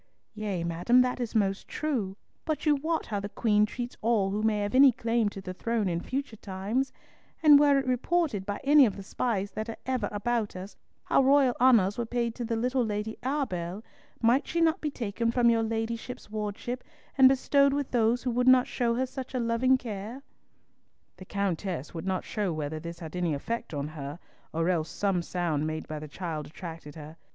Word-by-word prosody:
"Yea, 205 -5 -3
madam, 175 +9 +2
that 250 0 0
is 240 -2 -4
most 195 -2 +1
true, 230 -11 -2 0.3
but 310 0 -2
you 300 -1 +5
wot 320 +3 -1
how 205 -2 -2
the 200 +1 -5
Queen 210 0 +2
treats 245 +3 -5
all 215 -4 +2
who 210 +2 -1
may 215 -1 +1
have 205 0 -2
any 270 +1 +8
claim 230 -2 0
to 200 - -9
the 185 -1 -6
throne 225 +1 -1
in 170 -2 -1
future 270 0 -4
times; 205 +7 -2 0.5
and 295 -2 +9
were 285 -1 +5
it 275 - 0
reported 255 - 0
by 205 +1 -4
any 285 -1 +7
of 205 - -4
the 195 - -8
spies 200 -1 -2
that 220 +1 -5
are 225 - -5
ever 255 -5 -1
about 220 0 -1
us, 185 +2 -8 0.3
how - - +3
royal 270 -2 +4
honours 225 -5 +5
were 235 - 0
paid 235 -1 -1
to 240 - -5
the 230 0 -1
little 250 +2 +1
Lady 210 0 -3
Arbell, 215 - -2 0.4
might 245 +5 +3
she 340 - -1
not 330 -1 +2
be 300 - -1
taken 230 -3 -2
from 235 0 +4
your 230 -1 +2
ladyship's 225 +1 -4
wardship, 215 +4 -4 0.3
and 265 -1 +8
bestowed 280 +1 +3
with 285 -1 -2
those 235 0 +2
who 250 - 0
would 245 +2 +1
not 255 -1 +7
show 235 -1 0
her 260 +2 +1
such 260 0 -7
loving 245 +2 +2
care?" 225 +2 -7 0.9
The 185 - -11
Countess 185 -6 -3
would 165 +2 -6
not 190 -1 -1
show 205 -4 -2
whether 155 0 -3
this 170 +1 -7
had 165 -1 -8
any 175 -4 0
effect 230 +10 -4
on 145 -2 -3
her, 145 -1 -7 0.3
or 165 +1 0
else 170 -3 0
some 195 -3 0
sound 165 -4 -1
made 155 0 -4
by 155 -1 -5
the 155 - -8
child 155 -1 -5
attracted 165 -3 -9
her. 155 +1 -10
220 Hz, 200 wpm, -28 LUFS, 190-255 Hz, 0.9 s, and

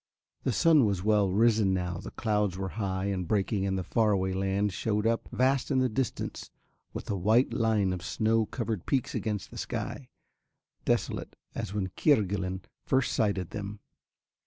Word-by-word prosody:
The 130 - 0
sun 155 +1 +5
was 95 -3 -1
well 105 -2 +3
risen 105 -2 +3
now, 90 -2 -2
the - - -7
clouds 105 -4 0
were 95 0 -3
high 95 -2 -2
and 95 -3 -2
breaking 100 0 +1
and 95 0 0
the 95 - -2
far 110 +3 +2
away 95 -1 0
land 95 +1 0
shewed 105 +3 -1
up, 115 0 0
vast 130 0 +2
in 135 - +2
the 130 -1 +3
distance, 120 0 -3 0.4
with - - -7
a - - 0
white 110 +7 +3
line 110 -5 +2
of 90 - -5
snow 110 +3 +1
covered 110 -6 -3
peaks 130 -3 0
against 105 -3 -3
the - - -7
sky, 130 -3 -4 0.8
desolate - - -1 0.2
as 100 - -4
when 95 -3 -1
Kerguelen 95 - +1 0.2
first 130 -1 +1
sighted 100 -5 0
them. 100 0 -5
105 Hz, 170 wpm, -29 LUFS, 95-115 Hz, 0.8 s, sun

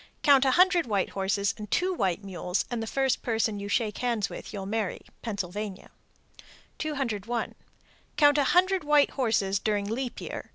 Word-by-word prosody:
Count 275 -2 +6
a - - +4
hundred 360 -4 +4
white 200 -4 0
horses 200 +1 0
and 210 -1 -7
two 370 +1 +1
white 190 - -1
mules, 180 -1 -2
and 240 -2 -2
the 225 - -4
first 270 +2 0
person 220 -3 0
you 200 - -5
shake 215 -1 0
hands 235 -5 0
with - - -8
you'll 200 -3 -5
marry. 210 -1 -2 0.2
Pennsylvania. 205 -2 -5 0.9
201. 240 -7 -2 0.6
Count 290 -1 +5
a 285 - +3
hundred 370 +3 +3
white 295 -1 +4
horses 215 -7 +1
during 205 0 0
leap 240 +4 -3
year. - - -7
225 Hz, 165 wpm, -27 LUFS, 200-275 Hz, 0.9 s, Count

